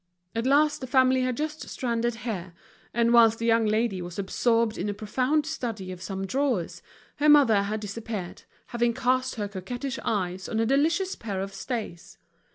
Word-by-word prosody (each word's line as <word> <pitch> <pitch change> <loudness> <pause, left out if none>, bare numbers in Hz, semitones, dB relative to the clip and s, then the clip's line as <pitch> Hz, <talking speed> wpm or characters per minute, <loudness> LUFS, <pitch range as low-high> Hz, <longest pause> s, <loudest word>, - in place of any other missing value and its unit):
At 230 +2 -1
last 295 +2 +3
the 260 - -5
family 260 0 +4
had 255 -1 -1
just 305 0 -4
stranded 235 -2 -1
here; 185 -6 -4 0.4
and 235 0 +2
whilst 225 -1 +6
the 230 - -3
young 230 -1 +3
lady 215 -3 0
was 175 -1 -7
absorbed 230 +3 +1
in 210 - -3
a 205 - -3
profound 255 +8 0
study 230 -12 -4
of 180 -1 -9
some 195 0 -4
drawers, 255 -6 -1 0.4
the 300 +1 +4
mother 270 -9 +6
had 210 +2 -3
disappeared, 210 -3 -6 0.3
having 240 -1 0
cast 255 0 +1
her 210 -3 -3
coquettish 245 +8 -5
eyes 190 -3 -2
on 220 - -1
a 225 - +2
delicious 325 - +2
pair 200 -4 -4
of 195 +1 -4
stays. 210 -5 -6
230 Hz, 175 wpm, -26 LUFS, 200-260 Hz, 0.4 s, whilst